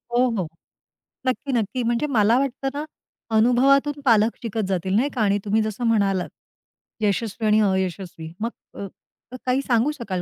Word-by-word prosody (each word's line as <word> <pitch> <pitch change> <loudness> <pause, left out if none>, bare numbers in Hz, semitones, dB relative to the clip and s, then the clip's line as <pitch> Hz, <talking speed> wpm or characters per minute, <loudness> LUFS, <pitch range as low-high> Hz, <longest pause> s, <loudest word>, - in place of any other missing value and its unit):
हो, 250 +1 +4
हो. 180 - -1 0.8
नक्की, 260 +2 -1
नक्की. 240 +2 -1
म्हणजे 240 +5 0
मला 230 -3 +3
वाटतं 270 0 -2
ना, 295 +1 -4 0.5
अनुभवातून 275 +5 +3
पालक 225 -1 +4
शिकत 220 -2 -2
जातील 190 0 -1
नाही 255 +7 +2
का. 235 - 0
आणि 205 -1 +2
तुम्ही 215 +2 +2
जसं 215 +2 -3
म्हणालात, 195 -4 +1 0.7
यशस्वी 215 +1 -1
आणि 215 +1 +4
अयशस्वी 180 -3 -4
मग 230 - 0 0.3
अ - - -4 0.5
अ - - -5
काही 255 +2 +2
सांगू 240 +3 +2
शकाल 190 -6 -3
225 Hz, 160 wpm, -23 LUFS, 200-250 Hz, 0.8 s, हो